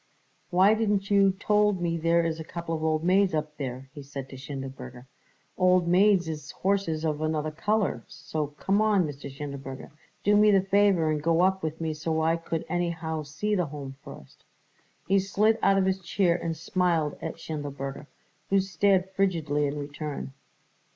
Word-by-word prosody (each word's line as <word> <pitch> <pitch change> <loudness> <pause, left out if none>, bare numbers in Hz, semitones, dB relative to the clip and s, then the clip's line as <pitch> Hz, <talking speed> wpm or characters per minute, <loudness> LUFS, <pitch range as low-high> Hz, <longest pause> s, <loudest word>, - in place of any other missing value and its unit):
"Why 185 +4 +5
didn't 210 -2 0
you 195 -1 +5
told 210 0 +2
me 170 -1 -1
there 170 +1 +2
is 165 -1 -2
a - - -4
couple 165 -1 -5
old 155 0 +1
maids 185 0 +3
up 150 0 -3
there?" 130 -1 -5
he 145 - -8
said 135 -1 -8
to - - -9
Schindelberger. 130 -2 -8 0.5
"Old 180 -1 +4
maids 185 0 +4
is 155 -2 -6
horses 185 -5 -1
of 155 -1 -1
another 155 -1 -1
colour; 210 +6 0
so 155 -2 -4
come 190 +8 0
on, 210 -4 +3
Mr. 140 -1 -7
Schindelberger, 135 -1 -7 0.3
do 205 +1 +4
me 210 +1 +6
the 200 -2 +5
favour 195 -4 +3
and 150 -1 -1
go 165 +2 +2
up 190 +1 +2
with 160 0 -4
me 160 -1 -2
so 160 +1 -2
I 165 +1 +3
could 165 -1 -4
anyhow 165 -2 -2
see 155 +9 -3
the 180 -5 +1
Home 140 -2 -7
first." 65 - -13 0.6
He 195 +1 +4
slid 210 +3 +2
out 195 0 +4
of 190 - +3
his 190 0 0
chair 180 -1 +1
and 165 -2 -3
smiled 165 -2 0
at - - -4
Schindelberger, 145 -2 -6 0.4
who 195 - +4
stared 190 0 +2
frigidly 160 -7 0
in 140 +1 -4
return. 145 -1 -5
165 Hz, 175 wpm, -27 LUFS, 150-190 Hz, 0.6 s, me